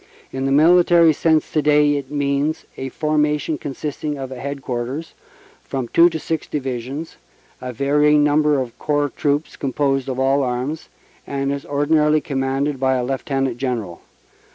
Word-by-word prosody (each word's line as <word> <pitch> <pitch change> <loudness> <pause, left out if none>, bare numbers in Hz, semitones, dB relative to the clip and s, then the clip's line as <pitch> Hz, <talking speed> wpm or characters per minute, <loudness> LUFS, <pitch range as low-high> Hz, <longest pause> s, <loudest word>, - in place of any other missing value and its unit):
In 135 0 -2
the - - 0
military 170 +2 +5
sense 160 +1 +1
to 155 - +1
day 150 0 +4
it 140 -2 -4
means 145 +1 -1
a 135 - -5
forma 150 0 +1
tion 150 0 -4
consisting 145 +1 -4
of 135 -1 -6
a 130 - -7
Headquarters, 135 +1 -4 0.5
from 130 -3 -4
two 170 +1 +6
to 160 - -4
six 160 0 -3
Divisions, 135 +2 -5 0.4
and 125 - -5
a - - -6
varying 150 +3 +3
number 150 0 +3
of 125 -3 -4
Corps 145 -2 0
Troops 145 +1 -1
composed 135 -1 -1
of 130 - -3
all 135 +1 +2
arms, 130 +4 -3 0.4
and 140 0 -2
is 140 +4 -5
ordinarily 150 +1 +2
commanded 135 0 -2
by 130 0 +2
a 125 - 0
Lieutenant 135 -1 -2
General. 115 -10 -3
140 Hz, 160 wpm, -20 LUFS, 135-150 Hz, 0.5 s, two